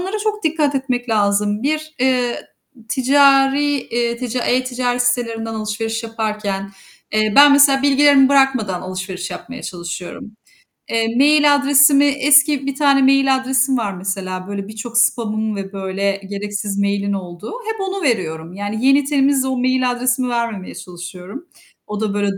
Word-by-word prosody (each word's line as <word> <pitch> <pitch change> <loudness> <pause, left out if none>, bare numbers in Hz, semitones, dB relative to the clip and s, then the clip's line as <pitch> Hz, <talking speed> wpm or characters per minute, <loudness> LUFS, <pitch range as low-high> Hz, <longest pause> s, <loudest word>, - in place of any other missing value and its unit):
onlara 385 +4 -3
çok 425 -2 -3
dikkat 305 -2 0
etmek 255 -2 -2
lazım. 205 0 0
Bir, 310 +2 -2
eee, 250 -2 0 0.5
ticari, 275 +2 +3 0.2
eee, 235 0 -1
tica 250 0 -4
e-ticaret 250 -1 0
sitelerinden 230 -2 -2
alışveriş 220 +1 -4
yaparken, 215 -3 -4 0.4
eee, 215 0 +1
ben 285 0 +8
mesela 280 -1 +5
bilgilerimi 280 -1 +5
bırakmadan 260 -9 +1
alışveriş 185 0 -6
yapmaya 255 +8 -9
çalışıyorum. 175 +3 -7 0.6
Eee, 230 0 -1
mail 290 +1 +5
adresimi, 280 0 +4
eski 285 0 +3
bir 275 - -3
tane 280 -1 +3
mail 270 0 +4
adresim 260 0 0
var 210 -4 -2
mesela, 185 0 -5
böyle, 200 0 -5
birçok 225 +2 -6
spam'ın 220 -2 0
ve 195 0 -7
böyle 195 +1 -3
gereksiz 205 0 -4
mail'in 200 0 -1
olduğu. 180 - -7 0.2
Hep 435 - -8
onu 385 0 -4
veriyorum. 170 - -2
Yani 205 +4 -4
yeni, 275 +2 +4
temiz, 275 -1 +1
o 260 -1 -2
mail 255 0 +1
adresimi 250 +1 -1
vermemeye 230 -5 -4
çalışıyorum. 180 - -10 0.4
O 210 0 -5
da, 215 -2 -1
böyle, 200 -1 -1
240 Hz, 145 wpm, -18 LUFS, 205-275 Hz, 0.6 s, ben